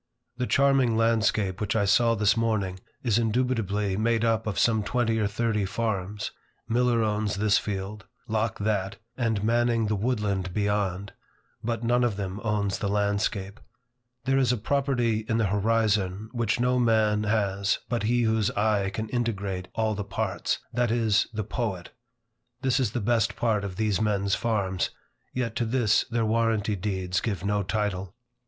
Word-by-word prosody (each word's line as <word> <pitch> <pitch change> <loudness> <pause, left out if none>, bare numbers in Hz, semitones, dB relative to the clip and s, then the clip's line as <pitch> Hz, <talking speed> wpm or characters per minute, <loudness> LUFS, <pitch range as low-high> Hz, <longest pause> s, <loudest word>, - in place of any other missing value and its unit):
The 125 0 -1
charming 135 -4 +3
landscape 110 -4 +1
which 105 - -1
I 105 -2 +2
saw 115 +4 +4
this 105 0 +3
morning, 105 -5 0 0.2
is 115 -3 +2
indubitably 110 -4 0
made 115 +1 +1
up 115 -1 +1
of 105 - -2
some 110 -2 +3
twenty 115 +2 0
or 105 - +2
thirty 110 0 0
farms. 105 -1 -2 0.4
Miller 120 0 +2
owns 105 -1 0
this 105 +1 +3
field, 100 +1 -5 0.2
Locke 110 +1 -1
that, 100 -1 -1 0.2
and 110 -5 0
Manning 115 0 +2
the 105 0 0
woodland 100 -5 -1
beyond. 100 -2 -1 0.5
But 115 +1 -2
none 120 +1 +2
of 120 -4 +1
them 95 0 -4
owns 105 -3 0
the 100 - -1
landscape. 100 0 -1 0.7
There 135 0 +3
is 130 -2 +3
a 125 - 0
property 120 -2 +1
in 110 - +2
the 115 - +2
horizon 105 -1 +1
which 115 -4 0
no 125 +1 +2
man 110 -3 +2
has 100 -3 +1
but 120 -1 -1
he 120 +3 +2
whose 110 -2 +2
eye 105 -2 +2
can 110 +2 -4
integrate 100 -6 -2
all 110 -1 +1
the 105 0 -3
parts, 100 0 -2 0.2
that 120 0 +1
is, 110 -2 +2
the 110 -1 -3
poet. 100 -4 -4 0.7
This 130 0 +2
is 115 -5 0
the 120 - -1
best 115 +2 +1
part 110 -4 +1
of 95 -2 -5
these 105 -2 0
men's 100 -2 +1
farms, 100 -6 0 0.4
yet 120 -3 -2
to - - +1
this 115 -3 +2
their 115 -1 -1
warranty 110 -2 +1
deeds 95 -2 -2
give 100 -5 -3
no 105 0 +1
title. 95 -2 -2
110 Hz, 165 wpm, -26 LUFS, 100-115 Hz, 0.7 s, saw